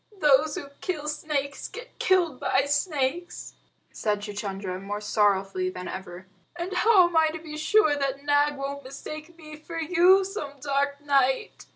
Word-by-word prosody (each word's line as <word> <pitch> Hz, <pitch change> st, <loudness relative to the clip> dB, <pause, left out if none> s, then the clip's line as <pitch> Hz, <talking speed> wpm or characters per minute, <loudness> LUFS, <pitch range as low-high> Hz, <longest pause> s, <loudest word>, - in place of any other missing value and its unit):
"Those 300 Hz, -1 st, +4 dB
who 285 Hz, -6 st, -6 dB
kill 305 Hz, -6 st, -3 dB
snakes 295 Hz, -2 st, -3 dB
get -, -, -11 dB
killed 345 Hz, -8 st, +2 dB
by 270 Hz, -, +2 dB
snakes," 290 Hz, +2 st, -1 dB, 0.4 s
said 210 Hz, -1 st, -1 dB
Chuchundra, 195 Hz, -2 st, -5 dB
more 205 Hz, +1 st, -4 dB
sorrowfully 195 Hz, -3 st, +1 dB
than 180 Hz, 0 st, -7 dB
ever. 185 Hz, -1 st, -7 dB, 0.3 s
"And 350 Hz, +2 st, -4 dB
how 370 Hz, -1 st, +5 dB
am 345 Hz, -, -7 dB
I 320 Hz, 0 st, +5 dB
to 315 Hz, +1 st, -3 dB
be 310 Hz, -1 st, -9 dB
sure 310 Hz, +1 st, +3 dB
that 275 Hz, -1 st, -2 dB
Nag 290 Hz, 0 st, +2 dB
won't 280 Hz, +1 st, -5 dB
mistake 305 Hz, +5 st, -9 dB
me 305 Hz, -2 st, -10 dB
for 330 Hz, +2 st, -7 dB
you 360 Hz, +4 st, +5 dB
some 375 Hz, -8 st, -5 dB
dark 280 Hz, 0 st, -1 dB
night?" 275 Hz, +5 st, +1 dB
290 Hz, 160 wpm, -26 LUFS, 260-330 Hz, 0.4 s, how